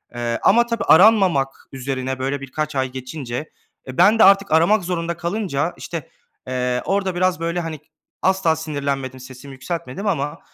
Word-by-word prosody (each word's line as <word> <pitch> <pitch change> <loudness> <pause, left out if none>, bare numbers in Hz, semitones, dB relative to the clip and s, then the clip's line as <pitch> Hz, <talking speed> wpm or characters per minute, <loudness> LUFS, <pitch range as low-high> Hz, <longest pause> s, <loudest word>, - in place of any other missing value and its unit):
eee, 120 -1 -2
ama 235 +5 +5
tabii 230 -1 -2
aranmamak 180 -8 +5 0.2
üzerine, 130 0 -4
böyle, 135 +2 -2
birkaç 150 +3 -4
ay 130 -1 -1
geçince, 130 +1 -6 0.4
e, 130 - -8
ben 205 +6 +5
de - - +8
artık 195 +1 +5
aramak 170 +6 +4
zorunda 170 -1 -3
kalınca, 175 -4 -2
işte, 165 -4 -6 0.4
eee, 125 -1 -1
orada 195 -2 0
biraz, 180 0 +1
böyle, 170 +1 -2
hani, 160 -2 -5 0.4
asla 190 -4 +2
sinirlenmedim, 140 -4 -4
sesimi 130 +2 -11
yükseltmedim 135 +6 -5
ama, 150 -4 -1
155 Hz, 155 wpm, -21 LUFS, 130-185 Hz, 0.4 s, de